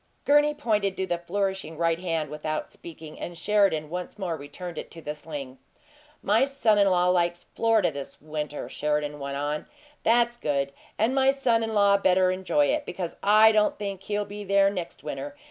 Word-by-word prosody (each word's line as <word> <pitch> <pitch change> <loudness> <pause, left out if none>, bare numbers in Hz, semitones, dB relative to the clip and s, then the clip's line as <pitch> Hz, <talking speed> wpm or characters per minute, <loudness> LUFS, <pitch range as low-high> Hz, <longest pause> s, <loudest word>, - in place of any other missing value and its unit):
Gurney 295 +1 +4
pointed 210 -7 0
to 190 - -1
the 175 -2 -2
flourishing 190 -2 -3
right 165 0 +1
hand 165 -4 -2
without 155 0 -4
speaking, 160 -2 -11
and 175 -1 -6
Sheridan 195 -6 +2
once 180 +3 -5
more 180 -5 -2
returned 160 +4 -7
it - - -8
to 165 - -11
the 150 - -3
sling. 145 -4 -8 0.6
"My 215 +5 +4
son 255 -7 +2
in 200 -1 +5
law 180 -1 +3
likes 175 -1 +1
Florida 225 -6 +2
this 140 -1 -8
winter," 150 -1 -5
Sheridan 150 0 -2
went 140 0 -4
on. 145 +1 -3 0.3
"That's 240 +1 +3
good, 140 -6 -1 0.2
and 225 +4 +2
my 265 0 +4
son 260 -4 +2
in 225 -1 -2
law 200 -1 +5
better 185 -1 +3
enjoy 190 +11 +1
it, 300 0 0
because 180 -10 -5
I 215 +2 +6
don't 215 -1 +2
think 200 -2 -5
he'll 205 +1 -2
be 205 +1 -7
there 200 0 +3
next 180 -7 -6
winter. 280 - -5
185 Hz, 185 wpm, -26 LUFS, 155-210 Hz, 0.6 s, I